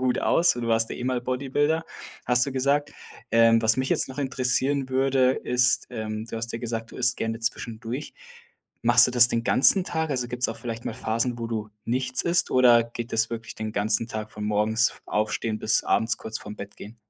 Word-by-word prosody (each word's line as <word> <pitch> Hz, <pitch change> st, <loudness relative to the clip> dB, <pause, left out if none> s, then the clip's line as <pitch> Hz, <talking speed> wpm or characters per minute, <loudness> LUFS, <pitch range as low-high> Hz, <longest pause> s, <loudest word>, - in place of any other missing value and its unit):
gut 125 Hz, -1 st, 0 dB
aus 170 Hz, -5 st, +3 dB
und 120 Hz, -, -5 dB
du 115 Hz, -, -3 dB
warst 115 Hz, 0 st, +1 dB
ja -, -, -5 dB
eh 125 Hz, -, -6 dB
mal 125 Hz, -1 st, -1 dB
Bodybuilder, 140 Hz, +6 st, -1 dB, 0.4 s
hast 125 Hz, 0 st, +4 dB
du -, -, -4 dB
gesagt. 140 Hz, +2 st, -1 dB, 0.4 s
Ähm, 115 Hz, 0 st, +4 dB
was 110 Hz, 0 st, +4 dB
mich 130 Hz, 0 st, -2 dB
jetzt -, -, +2 dB
noch 130 Hz, -, -10 dB
interessieren 135 Hz, 0 st, 0 dB
würde, 130 Hz, 0 st, +2 dB
ist 125 Hz, -1 st, +1 dB
ähm, 110 Hz, -2 st, -6 dB
du 115 Hz, -, -7 dB
hast 115 Hz, +1 st, -3 dB
ja 115 Hz, -, -4 dB
gesagt, 115 Hz, -1 st, -5 dB
du -, -, -12 dB
isst 125 Hz, 0 st, +2 dB
gerne 115 Hz, 0 st, -4 dB
zwischendurch. 115 Hz, +3 st, -4 dB, 0.7 s
Machst 120 Hz, +1 st, +7 dB
du -, -, -3 dB
das 120 Hz, 0 st, +8 dB
den 115 Hz, -1 st, -2 dB
ganzen 180 Hz, -, +4 dB
Tag? 160 Hz, -3 st, -3 dB
Also 125 Hz, -3 st, -2 dB
gibt's 125 Hz, 0 st, -1 dB
auch 115 Hz, -, -5 dB
vielleicht 115 Hz, -1 st, -7 dB
mal -, -, -4 dB
Phasen, 115 Hz, +3 st, -2 dB
wo 115 Hz, -, -4 dB
du 110 Hz, -2 st, -5 dB, 0.2 s
nichts 130 Hz, +1 st, 0 dB
isst 170 Hz, +1 st, +1 dB
oder 120 Hz, -2 st, +5 dB
geht 115 Hz, 0 st, -8 dB
das 110 Hz, 0 st, +1 dB
wirklich 115 Hz, -1 st, -7 dB
den 110 Hz, 0 st, -5 dB
ganzen 110 Hz, +3 st, 0 dB
Tag 110 Hz, -1 st, -7 dB
von 105 Hz, -, -8 dB
morgens 105 Hz, +2 st, +1 dB
aufstehen 110 Hz, +1 st, -2 dB
bis 110 Hz, -, +2 dB
abends 110 Hz, +1 st, +1 dB
kurz 110 Hz, 0 st, -6 dB
vorm 105 Hz, 0 st, -10 dB
Bett 100 Hz, -, -10 dB
gehen? 105 Hz, +3 st, -12 dB
120 Hz, 215 wpm, -24 LUFS, 115-130 Hz, 0.7 s, das